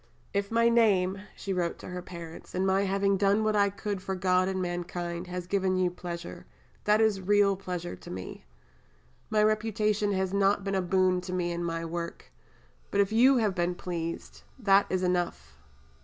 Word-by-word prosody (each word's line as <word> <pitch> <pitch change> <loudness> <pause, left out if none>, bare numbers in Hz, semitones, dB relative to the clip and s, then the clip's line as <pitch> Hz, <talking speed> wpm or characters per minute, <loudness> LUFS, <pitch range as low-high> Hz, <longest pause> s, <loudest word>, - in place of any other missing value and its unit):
"If 200 0 0
my 230 0 +3
name," 200 -5 +3
she 195 - -4
wrote 175 -2 -1
to - - -10
her 180 0 -5
parents, 170 -2 -10
"and 185 +1 +1
my 195 +1 +2
having 195 0 +1
done 200 +2 +3
what 215 0 +1
I 200 -1 +4
could 200 -1 -4
for 190 0 -3
God 185 0 +2
and 190 0 -1
mankind 175 0 -4
has 180 0 -5
given 190 0 +1
you 180 -1 +2
pleasure, 175 -1 -7 0.4
that 210 +1 +4
is 215 -3 +2
real 200 +1 +3
pleasure 180 -2 -5
to - - -13
me. 90 0 -7 0.9
My 215 -1 +3
reputation 215 -1 +1
has 190 0 -1
not 200 0 +2
been 195 0 -2
a 190 - +1
boon 185 0 +2
to 180 0 -6
me 175 -1 -1
in 170 0 -3
my 165 -1 -2
work; 170 0 -6 0.6
but 200 - -1
if 200 0 +3
you 255 +4 +5
have 215 -4 +1
been 175 0 -1
pleased, 170 -2 -5 0.2
that 200 -4 +4
is 185 0 0
enough. 175 - -1
190 Hz, 185 wpm, -28 LUFS, 175-200 Hz, 0.9 s, you